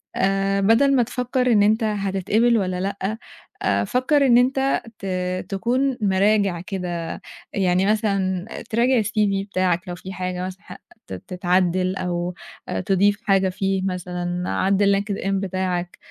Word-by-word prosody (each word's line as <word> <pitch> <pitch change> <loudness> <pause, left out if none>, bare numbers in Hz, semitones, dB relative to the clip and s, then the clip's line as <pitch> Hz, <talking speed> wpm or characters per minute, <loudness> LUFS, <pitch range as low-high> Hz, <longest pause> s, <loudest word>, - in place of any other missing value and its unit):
آآ، 195 0 +1
بدَل 235 +7 +4
ما 250 - +4
تفكّر 250 +1 -1
إن 210 -3 +5
أنت 220 +2 +3
هتتقبل 210 +3 +1
والّا 185 -3 -1
لأ، 200 +2 -3 0.4
آآ، - - +1
فكّر 275 +3 +2
إن 240 -2 +6
أنت 265 +2 +2 0.2
ت 195 - -8 0.4
تكون 250 +6 0
مِراجِع 195 -2 +2
كده 180 -4 -4 0.3
يعني 185 -1 +2
مثلًا 195 -3 0 0.2
تراجع 240 +2 +3
الCV 205 -2 0
بتاعك 185 0 0
لو 175 - -4
في 190 +2 -9
حاجة 180 0 -3
مثلًا 185 +1 -8
ح - - -10 0.3
ت - - -7
تتعدِّل 180 - 0
أو 175 -1 -2 0.4
آآ، - - -2
تضيف 200 +2 +2
حاجة 195 -1 +2
فيه 195 +1 -1
مثلًا، 180 -1 -3
عدِّل 200 +1 +2
LinkedIn 200 -1 -4
بتاعك 185 -2 -2
195 Hz, 140 wpm, -22 LUFS, 185-215 Hz, 0.4 s, إن